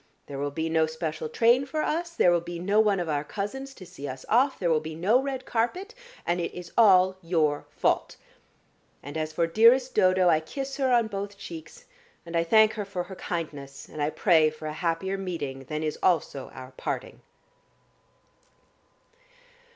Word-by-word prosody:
There 140 -1 -7
will 145 0 -1
be 160 +3 -3
no 160 -1 +2
special 155 -1 -4
train 235 - +4
for 310 +2 -2
us, 335 +2 -2
there 180 - +4
will 175 -1 +2
be 175 0 -6
no 200 +5 +1
one 210 -3 +3
of 175 - -2
our 145 -2 -1
cousins 265 - -5
to 185 - -11
see 170 -5 -8
us 130 -1 -7
off, 260 +4 +3
there 175 -3 0
will 155 - +3
be 155 0 -7
no 205 +10 +3
red 265 -2 -4
carpet, 360 - -2 0.3
and 175 +1 0
it - - -3
is 175 -1 -8
all 190 -4 +5
your 160 -4 0
fault. - - 0 0.9
And 145 +2 -8
as 155 0 -2
for 165 +2 +1
dearest 235 +9 +4
Dodo, 185 0 +4
I 160 -2 +5
kiss 270 - -6
her 265 -2 +1
on 240 -2 +4
both 200 -1 -5
cheeks, 160 -4 -10 0.4
and 170 0 -7
I 165 - +3
thank 220 +5 +5
her 210 -2 -4
for 185 -2 -4
her 190 - -10
kindness, 145 -7 -6
and 155 - -7
I 145 - +1
pray 160 -2 +4
for 155 0 -11
a 155 - -3
happier 175 +4 -2
meeting 145 -8 -5
than 155 +3 -4
is 155 -1 -3
also 160 -6 0
our 130 0 -10
parting." - - -5
175 Hz, 190 wpm, -27 LUFS, 155-220 Hz, 0.9 s, all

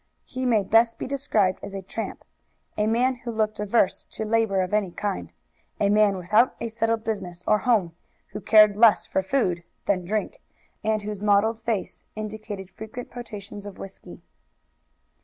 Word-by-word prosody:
He 255 0 -3
may 220 -4 +3
best 230 +3 +3
be - - -4
described 225 -9 +1
as 195 - -7
a 195 - -5
tramp, 220 +4 -6 0.5
a 210 0 +1
man 250 +3 +2
who 240 0 -8
looked 215 -2 -1
averse 210 -1 +1
to 220 - -5
labor 215 -3 +2
of 185 +2 -3
any 210 -3 +2
kind, 200 +2 -4 0.5
a 200 0 +3
man 210 -2 +4
without 210 +7 +3
a 230 - -3
settled 225 0 0
business 180 -6 -4
or 215 0 +3
home, 210 -9 +2 0.4
who 210 - -7
cared 215 0 +6
less 220 0 +5
for 190 - 0
food 190 -5 0 0.2
than 185 -3 +1
drink, 215 - -3 0.4
and 215 -1 0
whose 210 -1 -5
mottled 210 +2 +3
face 225 -3 -3
indicated 215 -3 -6
frequent 220 +5 -8
potations 205 -4 -8
of 200 - -9
whisky. 195 - -11
215 Hz, 165 wpm, -25 LUFS, 200-225 Hz, 0.5 s, cared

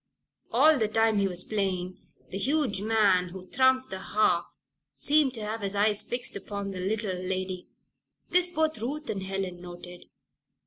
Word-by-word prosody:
All 310 -2 +5
the 220 - +2
time 220 0 +2
he 200 - +2
was 180 -1 -3
playing 185 -3 -2 0.3
the 195 - -3
huge 270 -4 +1
man 205 -4 +3
who 185 +1 -9
thrummed 260 +3 +2
the 190 - -4
harp 185 -4 +1 0.5
seemed 290 -3 +3
to 220 -2 -5
have 220 +1 -4
his 200 0 -3
eyes 205 0 +2
fixed 245 0 -2
upon 200 0 -5
the 185 - -6
little 205 +1 -1
lady. 185 0 -3 0.6
This 360 0 +5
both 315 -6 0
Ruth 290 +6 -3
and 195 - -4
Helen 190 -2 -4
noted. 175 0 -10
205 Hz, 165 wpm, -28 LUFS, 185-240 Hz, 0.6 s, All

